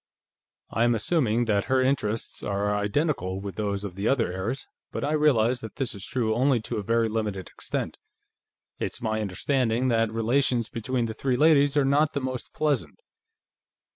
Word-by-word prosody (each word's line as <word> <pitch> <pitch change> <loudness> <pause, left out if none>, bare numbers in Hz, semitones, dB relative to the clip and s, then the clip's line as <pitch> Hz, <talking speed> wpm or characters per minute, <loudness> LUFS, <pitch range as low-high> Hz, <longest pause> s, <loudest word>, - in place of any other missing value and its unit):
"I 115 - +1
am 120 0 +3
assuming 120 -2 +1
that 100 -3 +1
her 130 0 +2
interests 130 -4 0
are 100 +1 0
identical 105 - 0
with 100 0 -6
those 100 -1 -2
of 95 - -5
the 100 +4 -2
other 120 -9 +1
heirs, 105 +9 -3 0.3
but - - -4
I 145 - 0
realize 130 -6 +3
that 110 - -8
this 135 -6 -2
is 100 - -8
true 115 -2 0
only 130 +2 +3
to 110 - -4
a - - -1
very 115 +2 +2
limited 105 -5 -3
extent. - - -4 0.8
It's - - -3
my 110 -1 -1
understanding 120 +5 0
that 115 -2 +2
relations 120 +1 +1
between 120 +1 -2
the 110 - -4
three 125 +2 0
ladies 145 -1 +4
are 140 - +4
not 145 +3 +3
the 140 - 0
most 130 -2 -4
pleasant." 150 - -1
115 Hz, 175 wpm, -26 LUFS, 105-135 Hz, 0.8 s, ladies